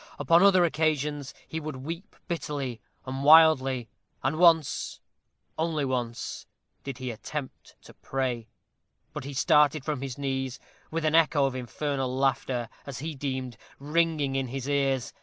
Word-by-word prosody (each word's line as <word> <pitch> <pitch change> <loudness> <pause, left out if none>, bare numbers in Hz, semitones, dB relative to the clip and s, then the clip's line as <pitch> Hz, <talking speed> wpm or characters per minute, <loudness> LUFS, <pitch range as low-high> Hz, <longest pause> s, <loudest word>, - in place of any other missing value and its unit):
Upon 165 +4 +4
other 190 -3 +6
occasions 150 -3 0 0.2
he 160 - -4
would 155 -2 -5
weep 165 +10 -7
bitterly 140 - -3 0.2
and 135 +1 -4
wildly; 140 -5 +6 0.4
and 150 +4 0
once 165 -4 +3 0.6
only 160 -3 0
once 125 -3 -3 0.4
did 135 -3 -6
he 130 -1 -4
attempt 130 +5 -7
to - - -14
pray; 125 -4 -3 0.7
but 150 -3 -6
he 140 - -6
started 150 -1 +4
from 150 -4 -2
his 135 -3 -5
knees 135 -2 -3 0.3
with 165 0 -2
an 155 - +2
echo 155 -3 +4
of 135 - -1
infernal 130 +1 -3
laughter, 130 -3 0 0.2
as 135 -3 -6
he 155 +3 -4
deemed, 130 -4 -4 0.2
ringing 150 -1 0
in 135 -1 0
his 135 +1 -5
ears. 135 -3 0
140 Hz, 145 wpm, -27 LUFS, 130-155 Hz, 0.7 s, other